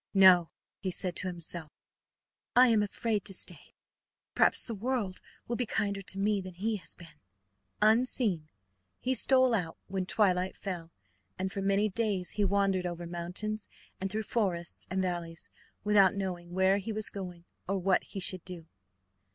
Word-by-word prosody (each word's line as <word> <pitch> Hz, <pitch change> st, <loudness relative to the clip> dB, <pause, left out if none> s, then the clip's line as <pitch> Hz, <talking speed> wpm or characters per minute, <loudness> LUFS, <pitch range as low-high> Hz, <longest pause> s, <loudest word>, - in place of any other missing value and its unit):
"No," 185 Hz, -3 st, +7 dB, 0.3 s
he 190 Hz, -, -2 dB
said 180 Hz, -1 st, -2 dB
to 185 Hz, -, -1 dB
himself, 170 Hz, -2 st, -4 dB, 0.9 s
"I 250 Hz, 0 st, +8 dB
am 220 Hz, -2 st, +4 dB
afraid 210 Hz, 0 st, -1 dB
to 195 Hz, -, -4 dB
stay. -, -, -4 dB, 0.6 s
Perhaps -, -, +4 dB
the 230 Hz, -, -5 dB
world 220 Hz, -3 st, -2 dB, 0.3 s
will 240 Hz, -, -1 dB
be 245 Hz, -, -1 dB
kinder 200 Hz, -3 st, -1 dB
to 190 Hz, 0 st, -3 dB
me 205 Hz, 0 st, +1 dB
than 185 Hz, -1 st, -9 dB
he 215 Hz, +4 st, -1 dB
has 185 Hz, -, -2 dB
been." 165 Hz, -3 st, -11 dB, 0.6 s
Unseen 215 Hz, -7 st, +3 dB, 0.5 s
he 260 Hz, -, 0 dB
stole 260 Hz, -1 st, +5 dB
out 175 Hz, -7 st, -1 dB
when 190 Hz, -1 st, -3 dB
twilight 185 Hz, -3 st, +2 dB
fell, 175 Hz, -4 st, -5 dB, 0.5 s
and 190 Hz, 0 st, -2 dB
for 195 Hz, -, -3 dB
many 200 Hz, +2 st, +2 dB
days 205 Hz, -3 st, -1 dB
he 210 Hz, -, 0 dB
wandered 195 Hz, -2 st, +2 dB
over 175 Hz, 0 st, -5 dB
mountains 180 Hz, +5 st, -3 dB, 0.3 s
and 195 Hz, -, -2 dB
through 215 Hz, +3 st, -2 dB
forests 185 Hz, -7 st, -2 dB
and 190 Hz, +1 st, 0 dB
valleys 170 Hz, -2 st, -4 dB, 0.3 s
without 200 Hz, -2 st, +5 dB
knowing 180 Hz, -3 st, -4 dB
where 190 Hz, +2 st, +3 dB
he 205 Hz, +3 st, -4 dB
was 215 Hz, 0 st, -2 dB
going 180 Hz, -3 st, -7 dB, 0.2 s
or 195 Hz, -, +1 dB
what 190 Hz, 0 st, +2 dB
he 195 Hz, -, -8 dB
should 185 Hz, -1 st, 0 dB
do. 175 Hz, -3 st, -8 dB
195 Hz, 165 wpm, -31 LUFS, 180-210 Hz, 0.9 s, I